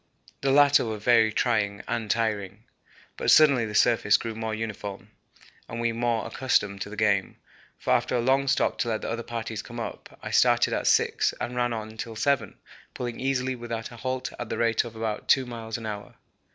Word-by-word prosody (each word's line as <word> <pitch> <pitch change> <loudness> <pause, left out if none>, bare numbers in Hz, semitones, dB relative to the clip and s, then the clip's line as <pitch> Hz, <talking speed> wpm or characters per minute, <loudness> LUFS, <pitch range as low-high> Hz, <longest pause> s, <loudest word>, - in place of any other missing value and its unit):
The 135 - +1
latter 145 0 +6
were 110 -2 -3
very 110 0 +4
trying 105 -3 0
and 115 -2 -2
tiring. 105 -2 -1 0.5
But - - -1
suddenly 140 -7 +6
the 105 - -6
surface 110 -3 +4
grew 115 -1 -5
more 110 0 -3
uniform 105 -2 -6 0.6
and 115 - -5
we 120 0 +1
more 115 0 -1
accustomed 100 -6 0
to 100 - -4
the 105 - -8
game, 100 -2 +1 0.4
for - - 0
after - - +1
a - - +2
long 135 +3 +2
stop 135 - +1
to 120 - 0
let 110 -1 -1
the - - -3
other 115 +1 -3
parties 115 -2 -5
come 120 +1 -9
up, 115 - -7
I - - -5
started - - +4
at - - -1
6 - - +2
and 120 +1 -4
ran 120 0 +1
on 110 -1 -6
till 115 0 -6
7, 115 -2 0 0.4
pulling 120 -2 -4
easily 130 -1 0
without 115 -1 -5
a 120 - -11
halt 130 +1 -3
at 120 - -5
the - - -3
rate 115 -1 +2
of 115 -1 -9
about 110 -1 -4
2 130 - +5
miles 115 -2 -6
an 115 - -8
hour. 105 -1 -6
115 Hz, 205 wpm, -26 LUFS, 110-120 Hz, 0.6 s, latter